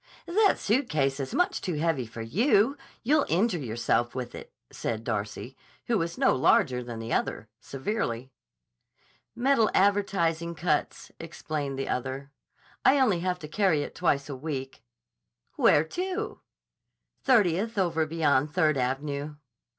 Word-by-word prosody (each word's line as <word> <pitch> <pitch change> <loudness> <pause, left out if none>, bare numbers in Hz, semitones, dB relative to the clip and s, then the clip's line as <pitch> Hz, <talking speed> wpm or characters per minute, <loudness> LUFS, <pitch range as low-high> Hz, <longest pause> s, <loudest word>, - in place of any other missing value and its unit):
"That 405 +4 +3
suitcase 155 - 0
is 135 -1 -4
much 360 0 +1
too 180 -4 -2
heavy 150 -6 0
for 115 0 -7
you. 220 - +3 0.3
You'll 290 +4 +3
injure 185 +2 +2
yourself 120 -1 -1
with 125 -2 -5
it," - - -10 0.2
said 110 -1 -3
Darcy, 110 +3 -4 0.3
who 230 -3 +1
was 170 0 -3
no - - +3
larger 125 -1 +3
than 120 -1 -7
the 115 +1 -4
other, 110 - -2
severely. 135 - -3 1.0
"Metal 245 -3 +3
advertising 175 -4 +1
cuts," 150 -1 -1
explained 150 -4 -4
the 135 - -3
other. 130 +2 -3 0.5
"I 280 +1 +5
only 215 -10 +3
have 180 +1 -1
to 150 - -6
carry 165 -3 +2
it - - -8
twice 140 -5 0
a 140 - -5
week." 135 -1 -5 0.7
"Where 150 - +4
to?" 375 - -4 0.8
"Thirtieth 215 -3 +2
over 165 -4 +1
beyond 150 -3 +2
Third 155 -3 +2
Av'nyeh." 140 +3 -2
160 Hz, 135 wpm, -27 LUFS, 135-205 Hz, 1.0 s, I